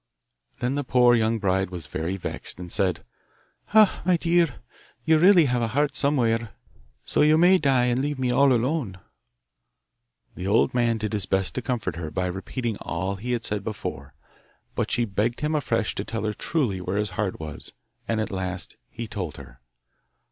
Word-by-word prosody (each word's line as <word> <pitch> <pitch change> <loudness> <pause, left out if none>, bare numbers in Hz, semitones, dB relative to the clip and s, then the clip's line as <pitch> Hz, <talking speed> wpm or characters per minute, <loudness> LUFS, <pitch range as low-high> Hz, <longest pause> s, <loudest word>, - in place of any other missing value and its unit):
Then 125 +2 0
the 145 +1 -1
poor 125 -1 +4
young 115 -1 +2
bride 95 -2 0
was 90 -3 -6
very 85 +4 -3
vexed, 90 - -5
and 90 -1 -7
said, 95 -2 +1 0.7
'Ah, 215 -2 +5
my 180 -1 +3
dear! 170 -4 +2 0.5
you 160 0 +4
really 180 -1 +7
have 125 -2 0
a 115 - +1
heart 145 0 +2
somewhere, 120 -6 +1 0.5
so - - +1
you 155 +1 +5
may 180 +3 +6
die 135 -5 +3
and 125 +1 +1
leave 145 0 -2
me 130 -1 0
all 135 +2 +4
alone.' 125 - 0 1.4
The 90 - -5
old 110 +5 +3
man 120 -2 +2
did 110 0 -3
his 105 -3 -1
best 95 -1 0
to 125 - -2
comfort 115 -8 -3
her 80 -2 -4
by 90 +4 -2
repeating 100 +5 -3
all 95 +4 -3
he 125 +5 -3
had 120 -1 -2
said 105 -2 -2
before, 75 - -6 0.6
but - - -1
she 120 - +2
begged 110 +4 -1
him 150 +1 0
afresh 145 -7 0
to 100 - -3
tell 110 0 -4
her 105 - -1
truly 115 - -1
where 90 +2 -2
his 105 -2 -1
heart 95 0 -2
was 75 -2 -6 0.3
and 115 -1 0
at 110 0 -2
last 95 -1 -3
he 115 -1 -6
told 90 -8 -5
her. - - -13
115 Hz, 185 wpm, -25 LUFS, 95-135 Hz, 1.4 s, really